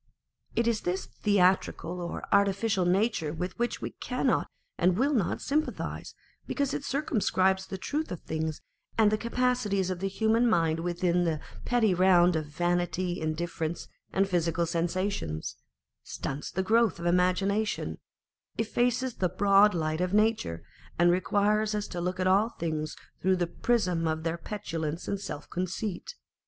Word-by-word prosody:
It 235 - +2
is 230 -2 +1
this 180 +2 -2
theatrical 185 -3 +1
or 170 - -5
artificial 200 -1 +2
nature 180 -3 +1
with 180 +6 -5
which 240 0 -1
we - - -3
cannot - - 0 0.3
and 180 +1 +3
will 280 +4 +2
not 215 -10 0
sympathise, 305 +3 -2 0.3
because 280 -1 -1
it - - -3
circumscribes 190 -9 +1
the 190 - -5
truth 300 +10 -3
of 180 - -4
things 160 -1 -3 0.4
and 215 -2 +5
the 215 - +2
capacities 235 -6 0
of 180 - -3
the 195 - -1
human 220 +4 +2
mind 165 -4 +2
within 175 +1 +1
the 160 -3 0 0.3
petty 230 -5 +3
round 180 -1 +5
of 155 -1 -2
vanity, 175 +2 -1
indifference, 160 +1 -3 0.2
and 195 +1 +2
physical 170 -2 +1
sensations, 170 - -2 0.5
stunts 140 +2 -5
the 190 - -1
growth 225 +1 +3
of 170 - -7
imagination, 185 +5 +1 0.6
effaces 245 +2 0
the 180 - +1
broad 200 +2 +5
light 155 0 -1
of 180 +2 0
nature, 210 - +1 0.3
and 175 +1 +5
requires 210 +4 +2
us 210 0 -2
to 175 - -4
look 180 +1 -2
at 185 - +1
all 195 +4 +4
things 155 -6 -3 0.3
through 190 +1 +3
the 180 -1 0
prism 180 -4 0
of 160 0 -1
their 165 0 -2
petulance 165 -5 -4
and 200 -1 -2
self 145 -6 -6
conceit. 185 - -4
185 Hz, 150 wpm, -29 LUFS, 170-215 Hz, 0.6 s, and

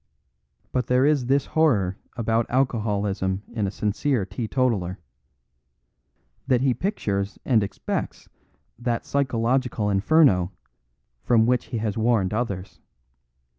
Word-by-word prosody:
But 125 -1 -1
there 125 +2 +3
is 145 -4 +2
this 135 +1 +2
horror 110 - +2 0.2
about 115 0 0
alcoholism 105 -6 0
in 110 -4 -1
a - - -1
sincere 105 +3 -1
teetotaler: 105 -2 -1 1.5
that 125 -3 +3
he 130 -1 +3
pictures 105 - -2
and 120 -5 +3
expects 100 - -4 0.5
that 120 -1 -2
psychological 125 -4 0
inferno 100 - +3 0.7
from 115 -2 +3
which 125 +1 +1
he 120 - -4
has 110 -1 -2
warned 110 -4 +2
others. 100 -5 -3
115 Hz, 110 wpm, -24 LUFS, 100-130 Hz, 1.5 s, there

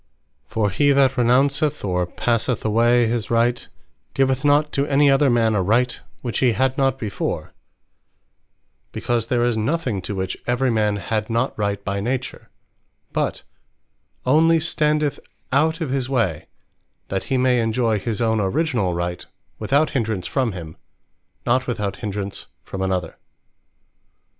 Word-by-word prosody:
For 105 -3 0
he 145 +8 +3
that 135 -2 +4
renounceth, 135 +3 +2
or 90 -2 0
passeth 115 +4 -1
away 120 +2 +3
his 115 -1 -2
Right, 120 +1 +1 0.5
giveth 135 0 +1
not 145 +1 +3
to 140 0 0
any 145 0 +4
other 135 0 +4
man 115 -2 +3
a 100 - +1
Right 120 +6 +1 0.2
which 120 -3 -2
he 125 -3 +3
had 130 +2 +1
not 135 -2 +1
before; 110 -6 -4 1.4
because 120 -2 -1
there 120 -1 +1
is 120 -2 +1
nothing 125 - -1
to 100 +3 -5
which 95 0 -3
every 125 +1 +1
man 105 -2 +1
had 105 +3 -2
not 115 +3 0
Right 100 -1 -2
by 100 0 -1
Nature: 125 +4 -4 0.6
but - - -1 0.8
onely 160 +5 +4
standeth 150 -2 +1 0.3
out 160 +5 +2
of 150 -5 -2
his 130 -2 -1
way, 105 - 0 0.6
that 95 -1 -2
he 135 - 0
may 125 -1 +3
enjoy 115 -1 +1
his 110 +1 -3
own 110 -1 +2
originall 105 - 0
Right, 85 0 -3 0.4
without 145 +3 +2
hindrance 110 -7 -1
from 130 -6 -1
him; 80 -3 -8 0.7
not 125 +1 +1
without 105 -5 -2
hindrance 100 -2 -5 0.2
from 95 - -6
another. 90 -3 -2
120 Hz, 145 wpm, -22 LUFS, 105-135 Hz, 1.4 s, that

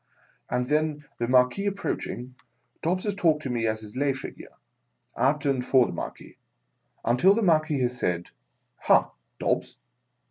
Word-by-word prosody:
And 125 0 0
then, 150 0 0
tHe 120 - 0
Marquia 125 +10 +3
approaching, 130 -10 -3 0.5
Dobbs 180 +3 0
has 205 - 0
talked 160 -6 +2
to 130 - -3
me 115 -2 0
as 110 0 -1
his 105 +1 -11
lay 140 +1 +1
figure, 135 - -9 0.7
at 145 +3 +1
and 135 -3 +1
for 125 -1 +4
the - - -5
Marquis, - - -7 0.7
until 125 - +5
the 230 - 0
Marquis 155 -5 +2
has 125 0 -1
said, 85 -3 -1 0.2
" - - -48
Ha, - - +4 0.3
Dobbs - - -1
135 Hz, 155 wpm, -26 LUFS, 125-155 Hz, 0.7 s, until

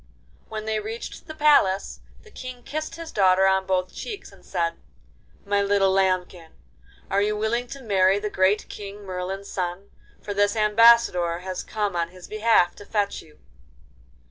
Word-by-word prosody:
When 215 -1 -5
they 220 0 -1
reached 220 +8 -7
the 315 - -8
palace 285 -11 +3 0.2
the 435 - -17
King 255 -6 -9
kissed 310 +4 -5
his 330 -1 -8
daughter 190 -1 +4
on 190 0 +2
both 185 -1 0
cheeks, 420 -4 -7
and - - -19
said: 170 -2 -2 0.7
'My 200 0 +1
little 200 -1 +3
lambkin, 185 -3 0 0.6
are 200 +1 +3
you 210 +1 0
willing 235 +3 -1
to 275 +1 -9
marry 195 -3 +3
the 210 0 -3
great 190 +3 +2
King 205 0 -9
Merlin's 190 +1 -5
son, 180 +2 -4 0.3
for 205 - -5
this 205 +1 +2
Ambassador 210 -6 +4
has 185 0 -4
come 205 -3 -3
on 170 -1 0
his 185 0 -13
behalf 215 -4 +3
to 205 - -11
fetch 205 -2 -1
you? 155 -1 -19
200 Hz, 165 wpm, -24 LUFS, 185-220 Hz, 0.7 s, daughter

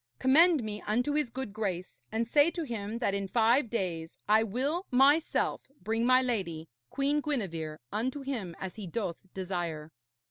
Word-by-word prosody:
Commend 305 +2 +5
me 210 -1 -5
unto 245 +7 +1
his 300 -4 +1
good 255 -3 -5
grace, 190 -5 -4
and 225 +1 -1
say 290 +6 +5
to 340 0 -4
him 225 -5 -4
that 235 -5 0
in 200 -1 -2
five 235 +4 +3
days 170 -7 -3
I 215 +1 +5
will 270 - -1
myself 280 +5 +3 0.2
bring 225 +5 0
my 255 0 +5
lady, 170 -10 -2 0.2
Queen 285 +2 +1
Gwenevere, 170 - -3
unto 255 +6 -2
him 230 -11 -4
as 190 +2 -6
he 205 -4 -6
doth 190 -1 -4
desire.' 175 -5 -4
225 Hz, 165 wpm, -30 LUFS, 190-265 Hz, 0.2 s, Commend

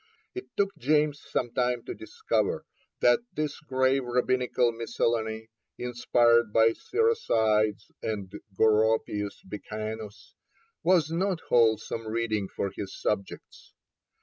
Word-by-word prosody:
It 375 0 -7
took 200 -1 +1
James 150 +2 +2
some 120 - -1
time 125 -1 0
to - - -5
discover 440 +7 -2 0.4
that - - +5 0.2
this 150 -1 -2
grave 130 -2 +1
Rabbinical 125 0 +1
miscellany, 115 -1 -2 0.3
inspired 120 -2 +2
by 115 +1 +5
Siracides 110 - +1
and 100 -4 -4 0.3
Goropius 110 -2 +2
Becanus, 110 +2 -7 0.5
was 170 -4 +3
not 180 +1 0
wholesome 115 -1 +2
reading 110 -3 -1
for 100 +1 -3
his 95 -1 -6
subjects. 100 -2 -4
115 Hz, 105 wpm, -28 LUFS, 110-140 Hz, 0.5 s, that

